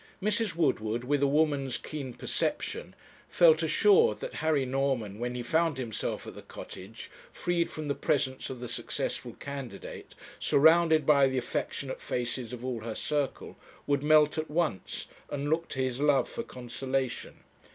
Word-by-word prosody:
Mrs. 210 -1 0
Woodward, 120 -8 +1
with 140 +2 +1
a 140 - +4
woman's 140 -3 +1
keen 135 -5 -6
perception, 465 +3 -2 0.3
felt - - +6
assured 435 +3 +4
that - - -5
Harry 150 -4 +2
Norman, 130 -6 -1
when 125 +1 -2
he 125 - -3
found 160 +3 +1
himself 120 -5 -3
at - - -8
the - - -10
Cottage, 105 +4 -10 0.2
freed 175 -1 0
from 155 -1 -6
the 140 - +1
presence 130 -2 0
of 130 - -6
the 125 - -5
successful 120 - -3
candidate, 140 -3 -8 0.2
surrounded 160 0 +5
by 140 -2 +6
the 130 0 -1
affectionate 130 +2 -3
faces 120 0 -3
of 125 0 -6
all 125 -3 -2
her 110 0 -5
circle, 145 -2 -2 0.3
would 140 -1 +1
melt 150 +1 +5
at 155 - -3
once 150 - -1 0.2
and 145 0 -2
look 165 +1 +1
to 135 - -2
his 130 +1 -2
love 145 -2 +4
for - - -5
consolation. 130 - -4
140 Hz, 160 wpm, -29 LUFS, 125-155 Hz, 0.3 s, felt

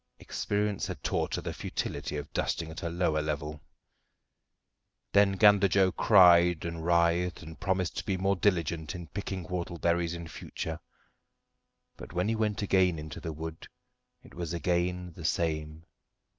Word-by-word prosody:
Experience 105 -1 -2
had - - -7
taught - - 0
her - - -4
the - - -4
futility - - -4
of 75 - -7
dusting 80 -1 -1
at 80 - -7
a 85 - -2
lower 85 -3 +1
level. 75 0 -4 1.5
Then 100 -1 +5
Gander 100 0 +6
Joe 95 -1 +3
cried 90 -5 +6
and 85 -1 -4
writhed, 85 +1 +2
and 80 0 -10
promised 95 -2 -1
to - - -2
be 95 -2 -1
more 95 +2 +1
diligent 85 -4 0
in 85 -3 -8
picking 95 -1 -4
whortleberries 85 -1 -1
in 85 -1 -7
future. - - -6 1.2
But - - -10
when 90 +2 0
he 115 - +1
went 105 -2 -1
again 95 -4 +3
into 75 -2 -7
the 80 - -5
wood 80 +1 -7 0.6
it - - -16
was 85 -1 -4
again 90 +1 -1
the 85 - -9
same. 80 -1 -1
85 Hz, 155 wpm, -29 LUFS, 80-95 Hz, 1.5 s, Gander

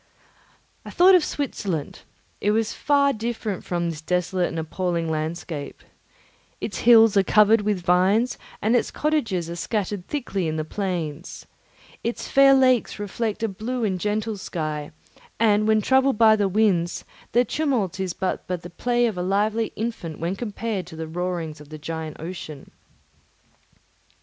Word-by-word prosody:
I - - -9
thought 370 +2 +6
of 360 -3 +6
Switzerland; 195 - -3 0.4
it 205 - +1
was 220 +1 +1
far 280 -1 +2
different 220 -3 -4
from 175 -1 -1
this 155 -2 -8
desolate 180 +2 0
and 165 - -6
appalling 165 0 -2
landscape. 155 -1 -4 0.8
Its 210 - -4
hills 225 -2 +6
are - - +7
covered 210 +3 +5
with 205 -3 -1
vines, 190 +8 +3 0.2
and 220 +4 +3
its 240 - +1
cottages 230 - -1
are 170 - -5
scattered 200 0 -3
thickly 200 - -2
in 155 - -2
the 155 -1 -2
plains. 170 -4 -4 0.6
Its 235 - -3
fair 275 0 +6
lakes 255 -3 +3
reflect 210 +2 -3
a - - +2
blue 230 +5 -4
and 190 -4 0
gentle 210 +2 -1
sky, 155 -6 -4 0.5
and 215 -1 +3
when 215 -1 +3
troubled 265 0 +3
by 220 -1 +6
the 205 -2 +1
winds, 185 -4 +1 0.3
their 245 +2 +4
tumult 240 - -1
is 185 -2 -2
but 190 - -2
as 180 -2 -2
the 175 - -10
play 240 +6 +1
of 215 -6 -2
a - - 0
lively 210 +4 0
infant 215 -8 -4
when 170 +4 -2
compared 210 -3 -4
to 160 - -10
the 160 0 -5
roarings 165 -2 -4
of 145 - -14
the 155 - -8
giant 160 0 -6
ocean. 160 -4 -8
200 Hz, 160 wpm, -24 LUFS, 170-225 Hz, 0.8 s, are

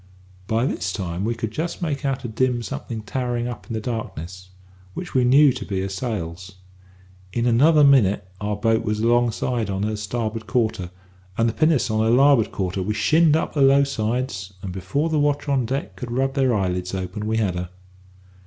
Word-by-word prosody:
"By 115 +3 +1
this 100 -8 -2
time 90 -1 -4
we 115 +1 -1
could 115 -2 -4
just 165 +7 -4
make 150 -3 -2
out 135 -1 -1
a - - -1
dim 120 +1 0
something 110 +2 -5
towering 120 0 -2
up 105 -6 -7
in - - -5
the 110 - -1
darkness, 95 -5 -6 0.5
which 180 - -6
we 130 - +3
knew 135 +2 +6
to 125 -4 -6
be 95 -2 -3
her 95 - -3
sails. 95 -4 -5 0.8
In 120 +3 -1
another 145 +6 +5
minute 105 -9 +4
our 105 0 -1
boat 115 +2 +1
was 105 -1 -1
alongside 120 -1 +1
on 95 0 -2
her 110 +1 -1
starboard 110 +1 -4
quarter, 110 -4 0 0.5
and 115 - +3
the 115 - 0
pinnace 155 -6 +2
on 110 0 +1
her 110 - +2
larboard 130 -1 +4
quarter; 95 0 -2
we 105 +3 -2
shinned 155 +6 +4
up - - -3
her 145 - 0
low 135 +1 +6
sides, 110 -6 -2
and 95 - -4
before 95 - -1
the 155 -2 +1
watch 145 0 0
on 135 -4 +1
deck 135 +3 -3
could 125 - -7
rub 135 +3 0
their 135 -2 +2
eyelids 90 -3 -1
open, 95 +3 -4
we 110 +1 0
had 105 -5 +1
her. 90 0 -4
115 Hz, 200 wpm, -23 LUFS, 100-130 Hz, 0.8 s, knew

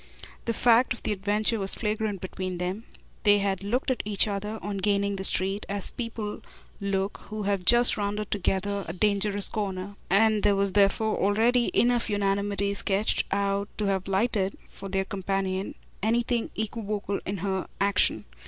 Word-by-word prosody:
The 230 - 0
fact 245 +2 +4
of 240 - -11
the - - -1
adventure 210 +3 0
was 195 -1 -1
flagrant 210 -3 -2
between 185 -1 -4
them; 185 +6 -3 0.4
they 205 -2 +5
had 195 -1 -1
looked 245 +6 0
at 255 - -1
each 210 0 0
other, 210 +2 -3
on 205 0 -4
gaining 200 0 +1
the 190 - -4
street, 195 +2 +2
as 200 -1 -1
people 225 -3 -5 0.4
look 195 0 -1
who 215 0 -5
have 200 -2 -1
just 240 +4 +5
rounded 205 0 -2
together 200 0 0
a 165 - -4
dangerous 200 +1 +2
corner, 200 -2 -3 0.2
and 215 +2 +4
there 205 -1 +3
was 200 0 +1
therefore 205 +2 +3
already 230 +5 +3
enough 240 -1 +3
unanimity 200 0 0
sketched 200 +1 +1
out 200 0 0
to 210 - 0
have 190 -1 0
lighted, 195 0 +1
for 195 - -9
her 190 0 0
companion, 195 0 -2 0.3
anything 235 +2 +1
equivocal 210 -2 -3
in 195 +1 -2
her 190 0 -2
action. 195 - +2
200 Hz, 160 wpm, -27 LUFS, 195-215 Hz, 0.4 s, they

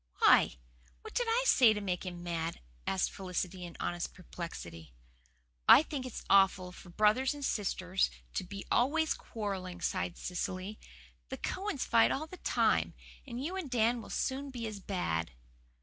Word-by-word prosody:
"Why, - - +6 0.5
what - - -10
did 485 - 0
I 470 +2 +3
say 245 - +6
to 210 - -3
make 185 -2 -3
him 175 -1 -6
mad?" 170 -1 -3 0.3
asked 190 -1 +1
Felicity 185 -1 -4
in 170 - -10
honest 175 0 -3
perplexity. 85 - -8 0.8
"I 290 - +10
think 275 -5 -4
it's 250 - -7
awful 190 -2 +4
for 180 - -13
brothers 215 - +3
and 285 -1 -4
sisters 190 -4 0 0.2
to - - -1
be 195 +2 -7
always 315 +6 +3
quarrelling," 190 -5 -5
sighed 180 -1 -2
Cecily. 185 +3 -4 0.5
"The - - -4
Cowans 380 -8 -2
fight 230 -1 +5
all 305 - -1
the 365 +3 -11
time; - - +2 0.3
and 245 0 -5
you 360 +4 -3
and 370 -7 -4
Dan 235 0 +2
will - - -11
soon 275 +2 -2
be 240 -3 -5
as 215 -2 -5
bad." 130 - -2
200 Hz, 165 wpm, -32 LUFS, 180-255 Hz, 0.8 s, I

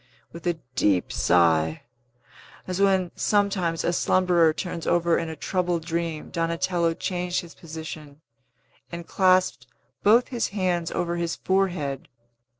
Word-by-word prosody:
With 170 +1 -7
a 175 - +1 0.2
deep 100 -7 +1
sigh 80 -2 +2 0.8
as 185 +1 -3
when, 190 -3 +3
sometimes, 195 -5 +1
a 170 - +1
slumberer 175 -2 +3
turns 170 +1 -5
over 170 -1 +3
in 165 -1 -4
a 160 - -6
troubled 175 0 -1
dream 165 -2 -3
Donatello 170 0 0
changed 180 0 -2
his 170 -2 -12
position, 155 -3 -9 0.7
and 170 0 -6
clasped 185 0 +2 0.3
both 230 +4 +4
his 240 -3 -1
hands 180 -4 -1
over 175 0 -2
his 170 -1 -2
forehead. 180 -8 -1
170 Hz, 130 wpm, -25 LUFS, 165-185 Hz, 0.8 s, both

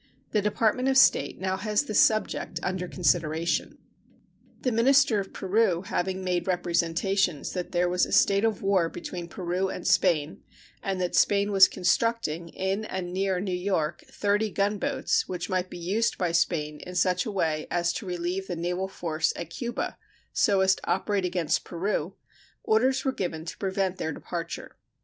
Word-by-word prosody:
The 210 - +2
Department 220 +4 +1
of 265 - +3
State 270 - +4
has 190 +3 0
now - - -16
this 215 - +2
subject 215 -5 +2
under 180 0 -2
consideration. 165 -1 0 0.8
The 255 - 0
minister 245 0 +4
of 195 - -5
Peru 190 -2 +1
having 190 -2 -2
made 180 -1 -1
representations 175 -1 0
that 180 -2 -4
there 175 0 +2
was 180 +1 +1
a - - -9
state 200 +1 +4
of 225 -3 0
war 190 -4 +2
between 175 0 -6
Peru 180 +2 -2
and - - -6
Spain, 160 -5 +2 0.4
and 195 -1 -2
that 180 -1 -1
Spain 205 0 +3
was 195 -1 +8
constructing, 180 -4 0
in 190 +4 -2
and 185 -4 -5
near 190 -1 0
New 185 -1 -3
York, 180 -4 -1
thirty 205 +1 0
gunboats, 200 +1 0
which 180 +1 -4
might 185 0 0
be - - -8
used 195 +7 0
by 180 -2 0
Spain 155 -3 0
in 180 - -9
such 180 +1 +1
a - - -2
way 160 -6 -1
as 170 0 0
to 200 - -6
relieve 180 +2 -3
the 175 - -3
naval 180 +3 -2
force 165 -4 -1
at 170 -1 -7
Cuba, 240 +5 -4 0.3
so 200 -2 +3
as 190 0 +5
to - - -9
operate 200 -3 0
against 175 -3 0
Peru, 180 0 -2 0.5
orders 260 +5 +2
were 265 - +2
given 165 -8 -4
to 165 - -6
prevent 190 -1 -1
their 160 - -2
departure. 170 +2 -6
185 Hz, 170 wpm, -27 LUFS, 175-200 Hz, 0.8 s, was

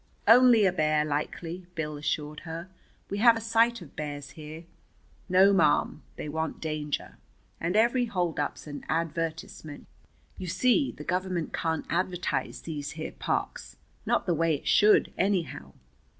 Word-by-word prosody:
"Only 240 -2 +7
a 185 - +3
bear, 155 -3 +2
likely," 165 +4 -4
Bill 150 -1 -3
assured 150 +1 -3
her. 165 +2 -7 0.4
"We 200 - -2
have 230 0 +6
a - - -3
sight 230 -1 +2
of 145 - -16
bears 145 -2 -6
here. 155 +2 -9 0.7
No, 190 +2 +6
ma'am, 155 -4 +2
they - - -6
want 160 +2 -3
danger. 155 -2 -4 0.4
And 170 +3 -1
every 240 +3 +3
holdup's 175 -8 -2
an 145 -1 -8
advertisement. 160 -2 -3 0.5
You 185 - -5
see, 255 - +2
the 150 - -10
Government 180 -1 -2
can't 160 -1 -1
advertise 180 0 -2
these 145 -3 -5
here 160 0 -5
parks; - - -3 0.3
not - - +1
the 175 - +1
way 165 -1 +2
it 140 - -8
should, 210 0 +5
anyhow. 190 -4 -1
165 Hz, 145 wpm, -28 LUFS, 150-190 Hz, 0.7 s, Only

